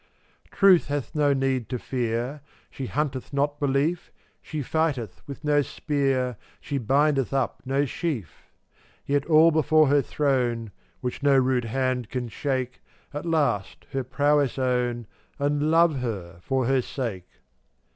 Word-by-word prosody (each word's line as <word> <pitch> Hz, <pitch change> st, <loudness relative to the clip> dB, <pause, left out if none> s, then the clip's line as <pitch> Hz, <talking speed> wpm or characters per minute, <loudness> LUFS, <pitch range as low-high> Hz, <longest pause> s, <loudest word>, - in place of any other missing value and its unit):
450 -, -, -21 dB
Truth 190 Hz, -3 st, +6 dB
hath 145 Hz, -2 st, -3 dB
no 150 Hz, -2 st, +3 dB
need 135 Hz, -3 st, 0 dB
to 125 Hz, -, -2 dB
fear; 120 Hz, +3 st, -2 dB, 0.3 s
She 135 Hz, -, -5 dB
hunteth 140 Hz, -2 st, -2 dB
not 145 Hz, +1 st, 0 dB
belief, 145 Hz, +5 st, 0 dB, 0.3 s
She 155 Hz, -1 st, -5 dB
flghteth 145 Hz, -5 st, -1 dB
with 140 Hz, +2 st, -8 dB
no 145 Hz, -1 st, +3 dB
spear, 135 Hz, -4 st, -1 dB, 0.2 s
She 140 Hz, -2 st, -3 dB
bindeth 135 Hz, +2 st, +2 dB
up 135 Hz, -3 st, -1 dB
no 135 Hz, +2 st, +1 dB
sheaf; 130 Hz, -, -5 dB, 0.5 s
Yet 140 Hz, 0 st, 0 dB
all 160 Hz, +1 st, +6 dB
before 155 Hz, -1 st, +4 dB
her 145 Hz, 0 st, +4 dB
throne 125 Hz, -6 st, 0 dB, 0.3 s
(Which 125 Hz, -1 st, -4 dB
no 140 Hz, -1 st, +4 dB
rude 130 Hz, -2 st, +2 dB
hand 125 Hz, 0 st, -1 dB
can 125 Hz, -2 st, -3 dB
shake) 130 Hz, 0 st, -3 dB, 0.3 s
At 145 Hz, +4 st, -5 dB
last 140 Hz, -12 st, 0 dB
her 135 Hz, -1 st, -1 dB
prowess 145 Hz, +1 st, +1 dB
own, 125 Hz, -2 st, 0 dB, 0.3 s
And 145 Hz, +1 st, 0 dB
love 165 Hz, -3 st, +4 dB
her 95 Hz, -9 st, -5 dB
for 130 Hz, +4 st, 0 dB
her 135 Hz, +1 st, +2 dB
sake. 115 Hz, -9 st, -5 dB
135 Hz, 145 wpm, -25 LUFS, 125-145 Hz, 0.5 s, Truth